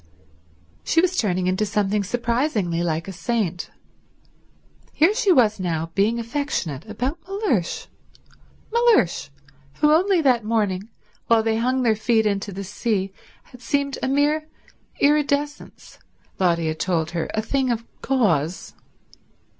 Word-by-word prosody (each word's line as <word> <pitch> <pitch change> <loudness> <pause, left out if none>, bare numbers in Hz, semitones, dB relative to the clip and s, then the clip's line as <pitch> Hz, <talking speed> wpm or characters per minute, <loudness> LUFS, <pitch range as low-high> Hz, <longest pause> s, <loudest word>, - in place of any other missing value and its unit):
She 330 - +2
was 365 +1 +2
turning 185 - 0
into 185 +3 +1
something 205 0 0
surprisingly 235 - -1
like 165 0 -2
a - - -5
saint. 200 -4 -2 1.2
Here 330 +7 +4
she 435 -4 +2
was 225 - +4
now 165 -3 -2
being 210 +5 +2
affectionate 230 - -3
about 255 +9 -3
Mellersh—Mellersh, 400 - -1 0.5
who 300 - +3
only 365 +4 +4
that 255 -7 +3
morning, 210 -2 -1 0.4
while 230 -1 +4
they 220 0 +1
hung 255 +3 +1
their 225 -2 +3
feet 220 0 +1
into 200 0 -1
the 195 +1 -6
sea, 195 -1 -2 0.3
had 250 - -16
seemed 280 +3 -1
a - - 0
mere 295 +3 +1 0.5
iridescence, 290 0 0 0.4
Lotty 170 -3 +2
had 155 0 -3
told 170 -3 0
her, 170 -2 -3
a 215 - +1
thing 265 +3 0
of 230 -1 -1 0.2
gauze. 180 - 0
225 Hz, 130 wpm, -23 LUFS, 185-280 Hz, 1.2 s, Here